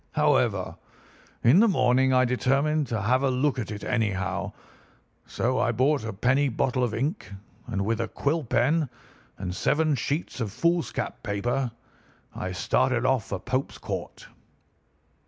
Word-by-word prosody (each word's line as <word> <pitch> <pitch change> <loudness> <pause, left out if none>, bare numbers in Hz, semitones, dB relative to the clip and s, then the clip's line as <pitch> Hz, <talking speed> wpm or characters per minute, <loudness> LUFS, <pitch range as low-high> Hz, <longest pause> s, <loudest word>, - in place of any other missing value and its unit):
However, - - +1 0.7
in 125 +10 +6
the 230 - +6
morning 130 - +3
I 130 0 +4
determined 135 +4 +1
to 115 -3 -2
have 125 +5 +2
a 135 - +2
look 130 +1 +1
at 110 - -4
it 105 -1 -6
anyhow, 100 -7 -1 0.8
so 130 +2 0
I - - +2
bought 130 +3 +2
a 110 - -3
penny 130 +8 +2
bottle 125 +1 0
of 115 -3 -1
ink, 140 - -3 0.4
and 100 -5 -2
with 115 +1 0
a 115 - -2
quill 155 +7 -1
pen, 135 +5 +1 0.5
and 90 -2 -4
seven 155 +6 +2
sheets 140 +3 -2
of 110 -3 -2
foolscap 170 - -1
paper, 120 +6 -1 0.6
I 95 - -4
started 125 +6 +1
off 130 -5 +2
for 95 - -3
Pope's 130 +8 -2
Court. - - -6
125 Hz, 150 wpm, -26 LUFS, 115-140 Hz, 0.8 s, in